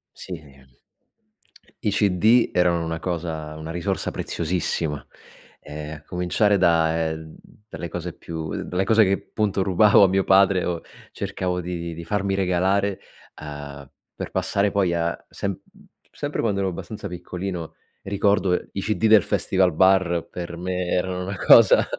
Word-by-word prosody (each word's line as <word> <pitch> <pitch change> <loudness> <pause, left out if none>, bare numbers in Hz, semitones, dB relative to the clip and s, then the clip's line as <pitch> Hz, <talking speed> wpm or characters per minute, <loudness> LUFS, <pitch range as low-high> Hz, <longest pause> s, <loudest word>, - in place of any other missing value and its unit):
Sì. 90 -4 -8 1.4
I 105 - +2
CD 105 +4 +3
erano 85 -2 +2
una 80 0 -4
cosa 80 -3 -4
una 80 +1 -6
risorsa 85 0 -2
preziosissima, 80 -3 -2 0.5
ehm, 75 +1 -8
a 75 - -16
cominciare 90 +4 +1
da, 80 -3 +2
ehm, 80 0 -7 0.3
dalle 85 - -6
cose 85 +1 -5
più 80 -2 -6
dalle 90 +2 -1
cose 110 +2 +5
che 95 -2 +3
appunto 100 -1 -1
rubavo 100 +2 +5
a - - +7
mio 95 +1 +1
padre 95 -1 +4
o 85 -2 -2 0.3
cercavo 90 -1 -3
di 90 0 -4
di 85 0 -5
di 85 +1 -8
farmi 100 0 -1
regalare, 95 +1 +1 0.4
uhm, 70 -2 -8 0.2
per - - -6
passare 100 0 0
poi 95 -4 +1
a 85 0 -2
sem 100 -2 -4 0.5
sempre 145 0 -3
quando 100 -4 0
ero 95 - 0
abbastanza 100 +3 -6
piccolino 90 -1 -6 0.3
ricordo 100 -1 +1 0.2
i 95 - -2
CD 110 +2 0
del 110 -3 +7
festival 95 -1 +1
bar 95 -1 +3
per 85 -1 -6
me 90 0 -2
erano 90 +1 -1
una 95 +2 -4
cosa 110 +1 +7
90 Hz, 145 wpm, -23 LUFS, 85-100 Hz, 1.4 s, a